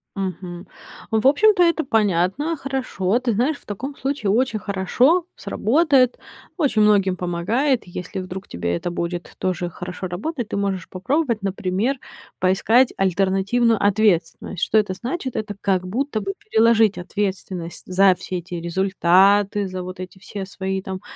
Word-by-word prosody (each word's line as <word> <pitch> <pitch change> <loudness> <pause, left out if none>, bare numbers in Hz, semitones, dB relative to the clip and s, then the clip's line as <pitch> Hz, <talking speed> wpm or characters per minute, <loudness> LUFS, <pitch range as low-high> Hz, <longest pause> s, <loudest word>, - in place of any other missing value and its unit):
Мгм, 185 -2 -5 0.4
в 220 +3 +3
общем-то, 385 +6 +5
это 335 -2 +2
понятно, 215 - +1
хорошо. 255 -7 -1
Ты 250 -2 0
знаешь, 260 +8 +1
в - - -24
таком 260 +8 -5
случае 270 -8 -1
очень 230 0 +1
хорошо 245 - +2
сработает, 270 0 +2 0.4
очень 280 - +2
многим 200 -3 +4
помогает. 215 +10 0
Если 180 +2 -6
вдруг 185 +1 -7
тебе 85 0 -2
это 175 - -3
будет 175 0 -4
тоже 180 -1 -2
хорошо 180 +2 -6
работать, 235 - -4
ты - - -2
можешь 195 -3 -2
попробовать, 235 - -1
например, 195 +6 -1 0.4
поискать 220 +7 +3
альтернативную 195 +5 +2
ответственность. 200 -3 +1
Что 220 - +2
это 210 -3 +2
значит? 255 - -4
Это 210 -1 -3
как 185 -2 0
будто 235 +3 -2
бы 390 - -3
переложить 225 - +3
ответственность 185 -2 -4
за 185 0 +4
все 185 +1 -5
эти 175 +1 -8
результаты, 190 +3 +3
за 185 -1 -5
вот 185 0 -8
эти 185 +1 -8
все 195 0 -6
свои, 190 0 -3
там, 190 0 -6
200 Hz, 145 wpm, -22 LUFS, 185-245 Hz, 0.4 s, общем-то